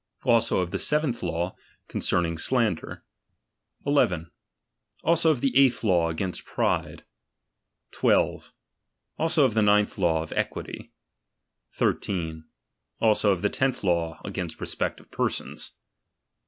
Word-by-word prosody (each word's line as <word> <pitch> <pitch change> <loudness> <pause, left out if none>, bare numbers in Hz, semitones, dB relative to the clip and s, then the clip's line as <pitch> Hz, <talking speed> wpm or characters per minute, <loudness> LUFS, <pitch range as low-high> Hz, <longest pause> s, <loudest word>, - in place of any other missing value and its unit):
Also 115 -4 +3
of 90 -1 -3
the 100 - -2
seventh 150 - +1
law, 85 +1 -2 0.3
concerning 85 -1 0
slander. 110 +1 -1 0.8
1 140 - 0 0.2
1. 85 -2 -6 0.7
Also 165 0 +3
of 145 -6 +1
the 135 - 0
eighth 130 -3 +4
law.against 90 -2 0
pride. - - -1 0.9
12. - - +1 0.7
Also 160 -3 +3
of 125 - +1
the 110 - +2
ninth 105 0 +3
law, 80 -3 +2
of 80 - -8
equity. - - -4 0.8
13. 80 -4 -2 0.5
Also 110 -2 +3
of 95 0 -1
the 105 - +3
tenth 130 0 -1
law, 85 -3 0
against - - -5
respect - - -2
of - - -21
persons. - - -3
100 Hz, 120 wpm, -26 LUFS, 85-125 Hz, 0.9 s, eighth